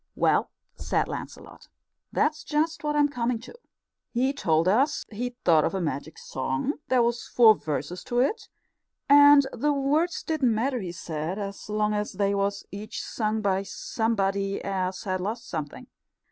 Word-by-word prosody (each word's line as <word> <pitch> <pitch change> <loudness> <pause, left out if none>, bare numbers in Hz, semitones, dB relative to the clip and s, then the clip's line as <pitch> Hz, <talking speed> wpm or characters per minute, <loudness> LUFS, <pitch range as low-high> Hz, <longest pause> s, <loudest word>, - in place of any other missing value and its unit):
"Well," - - +2 0.3
said - - 0
Lancelot, - - -8 0.4
"that's 305 0 0
just 315 +2 -1
what 295 0 -1
I'm 295 -1 +4
coming 245 -3 -1
to. 255 - -11 0.6
He 260 +3 +1
told 165 - +1
us 270 +10 +2
he'd 245 +3 -4
thought 160 -3 +5
of 165 - -1
a - - 0
magic 160 -2 -4
song. 135 - -3
There 255 -2 +3
was 235 0 -1
four 230 -3 +7
verses 160 0 -4
to 240 - -3
it, 285 - 0 0.6
and 285 0 +8
the 295 +1 +1
words 295 +5 0
didn't 270 -8 +1
matter, 250 +3 0
he 185 -5 -5
said, 175 +5 -4
so 210 - -9
long 210 0 +1
as 210 0 -2
they 200 +1 +1
was 200 0 -1
each 210 +2 -6
sung 215 -1 -2
by 195 -1 +1
somebody 200 -2 -1
as 185 -1 -2
had 185 -2 -2
lost 225 +5 -4
something. 150 -4 -5
215 Hz, 160 wpm, -26 LUFS, 190-270 Hz, 0.6 s, and